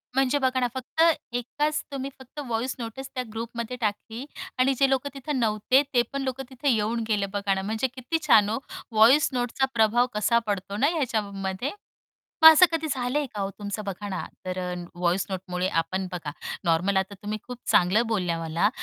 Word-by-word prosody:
म्हणजे 270 +1 +3
बघा 260 -1 +1
ना, 245 - +2
फक्त 260 +5 -2 0.3
एकाच 295 +5 -1
तुम्ही 275 0 -4
फक्त 265 +3 -11
व्हॉइस 240 +2 -1
नोटीस 240 +4 -6
त्या 255 - -1
ग्रुपमध्ये 235 +1 -4
टाकली 220 +4 -3 0.3
आणि 265 +1 +4
जे 275 -1 +5
लोक 270 +1 +1
तिथे 275 +2 -6
नव्हते, 235 +2 +3
ते 240 - +5
पण 275 - -2
लोक 260 0 -3
तिथे 265 +2 -1
येऊन 225 0 +1
गेले 210 -2 +1
बघा 200 -1 0
ना, 190 - -1
म्हणजे 220 +5 -1
किती 255 +6 -1
छान 210 -2 +6
हो. 225 - 0 0.3
व्हॉइस 235 +7 +6
नोटचा 245 +2 0
प्रभाव 235 +2 +3
कसा 235 +3 +3
पडतो 200 0 -2
ना 280 - +3
ह्याच्यामध्ये. 205 - -2 0.7
मग 320 - +13
असं 360 +4 +7
कधी 320 -1 -1
झालंय 265 +3 0
का 205 - -3
हो, 195 - -1
तुमचं 205 +1 -4
बघा 200 +1 -5
ना 190 - -3 0.2
तर 185 0 -3
अ, 180 0 -3 0.2
व्हॉइस 175 +2 +1
नोटमुळे 185 -1 -2
आपण 185 +3 -3
बघा 165 -4 -4 0.3
नॉर्मल 175 +4 +2
आता 190 +1 0
तुम्ही 210 +1 -3
खूप 250 -1 -7
चांगलं 185 +6 +4
बोलल्या 180 -7 0
मला, 165 +5 +1
225 Hz, 185 wpm, -26 LUFS, 200-260 Hz, 0.7 s, मग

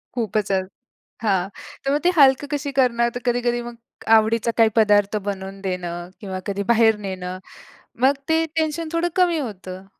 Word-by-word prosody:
खूपच 215 -3 -1
अ 190 - +3 0.6
हां. 190 -3 +1 0.4
तर 275 - +1
मग 295 - +1
ते 360 - +5
हलकं 270 0 +5
कशी 285 -1 -2
करणार? 235 -2 +3
तर - - -3
कधी-कधी 240 0 +1
मग, 240 0 -8 0.4
आवडीचा 225 +1 +2
काही 225 - +7
पदार्थ 205 -1 +3
बनवून 195 0 -5
देणं 175 -1 -4
किंवा 190 -2 -5
कधी 200 0 -2
बाहेर 225 -1 +4
नेणं. 185 -1 -5 0.7
मग 275 - +5 0.2
ते 325 0 +3
टेन्शन 315 0 -1
थोडं 340 +1 +1
कमी 355 -3 +3
होतं. 190 -6 -7
225 Hz, 160 wpm, -22 LUFS, 195-270 Hz, 0.7 s, काही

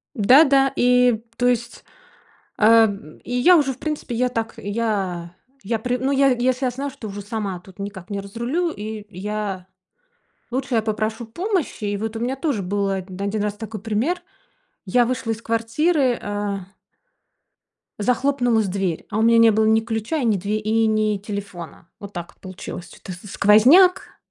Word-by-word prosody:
Да-да. 270 +4 +5
И 250 -2 +3
то 245 - +1
есть, 240 -1 -2 0.7
а, 225 0 +6 0.4
и - - -9
я 340 +9 +6
уже, 275 -3 +1
в 255 - -17
принципе, 300 -6 -4
я 250 +1 +1
так, 225 -2 -3
я 195 -5 -2 0.3
я 220 +3 -1
при 250 +2 -1
ну, 265 +2 -1
я 275 0 +4
если 255 +1 +1
я 250 - +1
знаю, 275 +3 -4
что 265 -5 -9
уже 205 0 -6
сама 205 -4 -4
тут 190 +2 -18
никак 200 -1 -7
не 200 - -3
разрулю, 235 - -2
и 215 -5 -6
я 200 -1 -4 0.9
лучше 260 0 -2
я 225 - +3
попрошу 220 +1 -2
помощи, 350 - -3
и 205 0 -1
вот 220 +2 -4
у - - -3
меня 245 +3 -1
тоже 275 - -1
был 200 +2 -1
1 195 +2 -3
раз 210 -1 -2
такой 220 -2 -7
пример. 235 +12 -1 0.6
Я 240 +6 +3
вышла 240 -1 -2
из 225 +1 -7
квартиры, 245 +4 +1
а 205 -2 -3 1.3
захлопнулась 245 0 +1
дверь. 185 -3 -2
А 215 - -2
у - - +2
меня 230 0 +5
не 230 0 +7
было 220 0 +2
ни 220 0 +4
ключа, 225 +7 -3
и 260 - -1
ни 215 -3 +3
две 205 +3 -2
и 220 +1 +1
ни 215 -1 +1
телефона. 195 -5 -8
Вот 200 0 -9
так 170 -1 -8
получилось. 185 -2 -8
Чё-то 185 - -10
с 185 +3 -11
сквозняк 260 - +5
220 Hz, 170 wpm, -22 LUFS, 205-250 Hz, 1.3 s, не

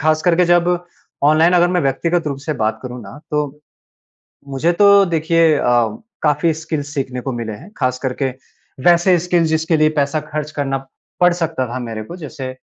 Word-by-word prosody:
ख़ास 155 -1 +2
करके 180 0 +3
जब 175 0 +3 0.6
ऑनलाइन 155 +4 +4
अगर 175 0 +4
मैं 180 0 +1
व्यक्तिगत 165 +4 0
रूप 140 -2 -3
से 145 +3 -3
बात 110 +1 0
करूँ 125 -1 -7
ना 110 +7 -11
तो। 150 -1 -2 0.9
मुझे 160 +6 +1
तो 200 0 +7
देखिए 165 -1 +2
अ, - - -1 0.6
काफ़ी 150 +2 +2
स्किल्स 155 -2 -5
सीखने 130 -3 -3
को 135 +1 -4
मिले 115 -2 -4
हैं। 105 - -11
ख़ास 125 0 0
करके 130 0 -1 0.6
वैसे 175 +1 +5
स्किल 175 0 +1
जिसके 160 +1 +1
लिए 155 0 +4
पैसा 140 +2 0
खर्च 150 0 -3
करना 135 -1 -1 0.4
पड़ 180 0 +5
सकता 165 -6 -2
था 120 +2 -4
मेरे 115 -3 -5
को 170 - -9
जैसे, 145 -5 -7
155 Hz, 180 wpm, -18 LUFS, 135-170 Hz, 0.9 s, तो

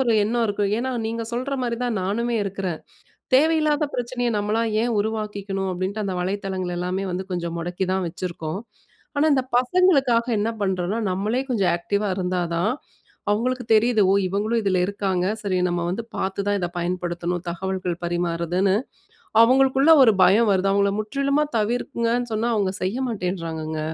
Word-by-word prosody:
ஒரு 245 -3 +2
எண்ணம் 235 +2 +1
இருக்கும். 205 -1 0
ஏனா, 260 +2 -2 0.2
நீங்க 230 +1 -3
சொல்ற 255 +4 -2
மாரி 235 -1 -1
தான் 235 -3 -1
நானுமே 235 +5 -1
இருக்கிறேன். 190 -4 -3 0.6
தேவையில்லாத 305 +1 +3
பிரச்சனைய 245 0 -1
நம்மளா 210 +2 0 0.2
ஏன் 235 0 0
உருவாக்கிக்கணும். 205 -2 -2
அப்படீன்ட்டு 190 +4 -3
அந்த 190 -2 -2
வலைத்தளங்கள் 190 -1 -3
எல்லாமே 185 +2 -2
வந்து 185 +1 -3
கொஞ்சம் 170 -2 -3
முடக்கி 175 +3 -2
தான் 190 -1 0
வச்சிருக்கோம். 170 0 -5 0.6
ஆனா, 285 +2 +3
இந்த 260 -2 +2
பசங்களுக்காக 265 -4 +3
என்ன 215 +2 0
பண்றோம்னா, 190 +2 -1
நம்மளே 210 +7 0
கொஞ்சம் 200 -7 +2
ஆக்டிவ்வா 200 +3 -1
இருந்தா 180 0 -1 0.2
தான் 190 +7 +1 0.6
அவங்களுக்கு 250 +4 0
தெரியிது. 220 0 +4
ஓ! - - +4
இவங்களும் 215 +5 0
இதில 195 -3 +1
இருக்காங்க. 190 -2 -1 0.2
சரி 195 -3 -1
நம்ம 175 0 -1
வந்து 195 +6 -3
பார்த்து 190 +1 -2
தான் 205 0 +2
இத 175 - -1
பயன்படுத்தணும். 175 0 -2
தகவல்கள் 185 0 -3
பரிமாறுதுன்னு, 175 +2 0 0.7
அவங்களுக்குள்ள 270 +5 +5
ஒரு 230 - +6
பயம் 210 +5 +5
வருது. 195 0 +2
அவங்கள 200 0 +2
முற்றிலுமா 275 +6 0
தவிர்க்கங்கன்னு 235 +2 -1
சொன்னா 225 +2 0
அவங்க 200 -3 +1
செய்ய 190 +5 -1
மாட்டேங்கிறாங்கங்க. 165 -7 -3
200 Hz, 150 wpm, -23 LUFS, 185-235 Hz, 0.7 s, ஒரு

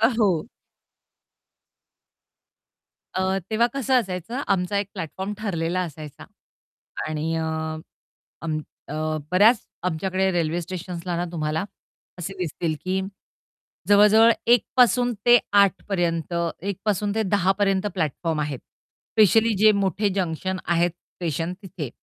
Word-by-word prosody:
अ, 225 - +6
हो. 190 -5 +2 2.7
अ, 190 +1 +1
तेव्हा 225 +2 +3
कसं 270 -1 0
असायचं 190 +5 -5
आमचा 190 +1 0
एक 200 - -1
प्लॅटफॉर्म 190 +2 -5
ठरलेला 180 -4 -1
असायचा 155 -4 -7 0.8
आणि 155 +1 -2
अ, 160 - -1 1.0
अम, 160 -2 -1 0.3
अ, - - -6 0.4
बऱ्याच 210 +6 +6 0.3
आमच्याकडे 190 +3 0
रेल्वे 170 -1 0
स्टेशन्सला 175 0 -5
ना 175 - -1
तुम्हाला 155 0 -1 0.5
असे 190 +3 -5
दिसतील, 170 -2 -2
की 190 +1 0 0.9
जवळ-जवळ 210 +3 +7 0.2
1 240 -1 +5
पासून 245 0 +4
ते 240 0 +8 0.2
8 195 -1 +1
पर्यंत 170 -3 -1 0.4
1 195 - -4
पासून 205 -1 0
ते 220 - +1
10 190 -2 +2
पर्यंत 195 -1 +1
प्लॅटफॉर्म 160 -1 -1
आहेत, 145 -3 -3
स्पेशली 220 - +1
जे 215 +1 +6
मोठे 195 +2 +1
जंक्शन 185 0 -2
आहेत 175 0 +2
स्टेशन 165 -1 -5
तिथे. 170 -7 -6
185 Hz, 120 wpm, -24 LUFS, 165-205 Hz, 2.7 s, ते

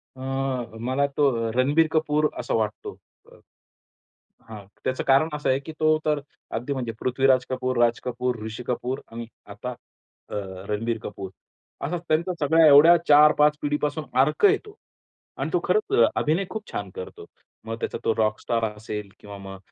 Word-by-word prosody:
अ, 130 - -12 0.6
मला 130 +4 0
तो 120 -6 +2
रणबीर 145 +7 +3
कपूर 155 -1 +1
असा 120 - -3
वाटतो, 110 -1 -2 0.3
अ, - - -16 1.1
हां. 105 -3 -9 0.2
त्याचं 130 0 -1
कारण 135 +4 +4
असं 150 -2 -2
आहे 130 +1 +2
की 150 +3 -9
तो 155 0 +4
तर 150 -1 +1 0.4
अगदी 125 +5 -3
म्हणजे 125 -3 -3
पृथ्वीराज 130 0 +2
कपूर, 130 -1 -2
राज 120 0 +2
कपूर, 125 0 -2
ऋषी 110 +2 -6
कपूर 125 +1 -2
आणि 115 0 -7 0.2
आता 125 +5 -6 0.6
अ, - - -4 0.3
रणबीर 115 +2 -1
कपूर. 100 -2 -6 0.6
असा 175 +4 -2
त्यांचा 170 +4 +1
सगळ्या 160 +2 +4
एवढ्या 150 +4 +8
4-5 150 0 +6
पिढीपासून 150 +1 -1 0.2
अर्क 150 - +2
आहे 400 0 +6
तो 420 -1 -13 0.6
आणि - - -2
तो - - +3
खरंच 425 -1 +1 0.2
अभिनय 165 +6 +1
खूप 220 -1 -7
छान 100 -1 -4
करतो. 90 - -8 0.4
मग 115 0 -4
त्याचा - - -3
तो 115 - +3
रॉक 110 -1 +1
स्टार 115 -1 -1
असेल 105 -1 -6
किंवा 100 -1 -10
मग 95 0 -9
130 Hz, 160 wpm, -24 LUFS, 115-150 Hz, 1.1 s, एवढ्या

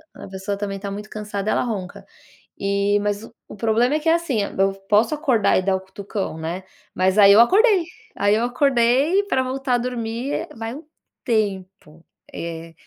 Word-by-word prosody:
a - - -10
pessoa 190 +1 -4
também 200 -1 -4
tá 200 0 -5
muito 210 +2 -7
cansada, 210 -1 -4
ela - - +1
ronca. 200 -7 -5 0.5
E, 200 +1 +1
mas 205 +1 -2
o 225 - -13 0.2
o - - -9
problema 230 +6 +1
é - - +1
que, 325 - +1
assim, 325 -10 +1
eu 195 0 0 0.2
posso 220 +7 +3
acordar 265 -9 +2
e - - +2
dar 190 0 +1
o - - -2
cutucão, 195 -1 -5
né, 170 +4 -5 0.3
mas 190 +2 +1
aí 200 -1 +8
eu 205 - +7
acordei 390 - +4 0.3
aí 205 +1 +2
eu 225 - 0
acordei 260 +6 +2
e - - -10
pra 260 -9 +1
voltar 260 0 -1
a - - +3
dormir, 240 +5 -3
vai 225 +1 -5
um 305 - -10 0.4
tempo. 195 - -3 0.3
Eh. 165 0 -7
215 Hz, 185 wpm, -22 LUFS, 195-250 Hz, 0.5 s, aí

